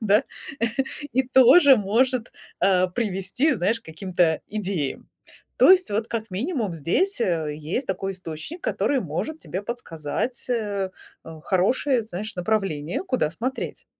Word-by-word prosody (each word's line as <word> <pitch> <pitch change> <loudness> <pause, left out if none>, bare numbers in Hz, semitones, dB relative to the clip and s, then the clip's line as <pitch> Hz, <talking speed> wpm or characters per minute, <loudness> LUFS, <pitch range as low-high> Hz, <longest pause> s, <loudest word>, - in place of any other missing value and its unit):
да. 210 -1 +4 0.9
И 260 +2 +3
тоже 265 +2 +7
может, 235 +4 +1 0.3
а, 185 -1 +4
привести, 210 - 0
знаешь, 215 +4 0
к - - -38
каким-то 165 0 0
идеям. 190 -9 -3 0.5
То - - +7
есть 370 - +5
вот 215 +2 -1
как 225 -2 -4
минимум 225 - -2
здесь, 240 - +1
э, 160 -7 0
есть 160 - -3
такой 195 +1 -2
источник, 180 - -7
который 280 -2 0
может 210 - -4
тебе 190 +3 -5
подсказать, 205 - -4
э, 205 -5 -1 0.3
а, 160 -1 -10
хорошее, 235 +7 +2
знаешь, 215 +2 -6
направление, 180 - -1
куда 255 - 0
смотреть. 255 - -4
205 Hz, 135 wpm, -24 LUFS, 180-250 Hz, 0.9 s, тоже